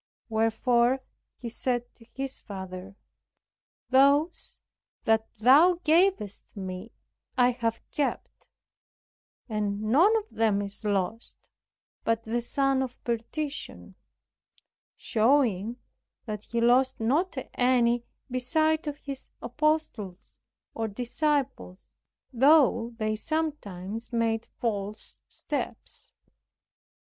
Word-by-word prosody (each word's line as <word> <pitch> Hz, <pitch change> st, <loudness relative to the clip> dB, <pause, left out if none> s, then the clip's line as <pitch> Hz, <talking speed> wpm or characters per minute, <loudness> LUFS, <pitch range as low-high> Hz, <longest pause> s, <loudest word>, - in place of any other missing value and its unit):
Wherefore 235 Hz, +3 st, +2 dB, 0.3 s
He 240 Hz, -, -7 dB
said 245 Hz, +1 st, -2 dB
to 230 Hz, -, -19 dB
His 270 Hz, 0 st, -4 dB
Father, 190 Hz, 0 st, -8 dB, 1.0 s
"Those 280 Hz, +5 st, +3 dB, 0.5 s
that 220 Hz, 0 st, +2 dB
thou 285 Hz, -, +6 dB
gavest 320 Hz, -, +1 dB
me 190 Hz, +3 st, -6 dB, 0.5 s
I 250 Hz, 0 st, +5 dB
have 230 Hz, -2 st, -3 dB
kept, 295 Hz, -2 st, -3 dB, 1.0 s
and 210 Hz, -3 st, -1 dB
none 300 Hz, -, +4 dB
of 435 Hz, -1 st, -4 dB
them 220 Hz, -3 st, +2 dB
is 200 Hz, +2 st, -4 dB
lost 205 Hz, +2 st, -2 dB, 0.6 s
but 230 Hz, 0 st, 0 dB
the 230 Hz, +2 st, -1 dB
son 275 Hz, +2 st, +2 dB
of 255 Hz, -2 st, -4 dB
perdition," 250 Hz, +6 st, -4 dB, 1.0 s
showing 230 Hz, -3 st, +2 dB, 0.5 s
that 215 Hz, -2 st, -5 dB
He 235 Hz, 0 st, -2 dB
lost 255 Hz, +2 st, +4 dB
not 285 Hz, +10 st, +1 dB, 0.2 s
any 245 Hz, -1 st, +3 dB, 0.3 s
beside 310 Hz, +5 st, +1 dB
of 290 Hz, -1 st, -3 dB
His 275 Hz, -2 st, -7 dB
apostles, 245 Hz, -, -2 dB, 0.4 s
or 225 Hz, -1 st, -2 dB
disciples, 250 Hz, -2 st, -2 dB, 0.5 s
though 250 Hz, -3 st, +4 dB
they 215 Hz, -1 st, 0 dB
sometimes 230 Hz, -, -3 dB
made 230 Hz, -1 st, 0 dB
false 210 Hz, -2 st, -4 dB
steps. -, -, -4 dB
235 Hz, 95 wpm, -28 LUFS, 215-275 Hz, 1.0 s, thou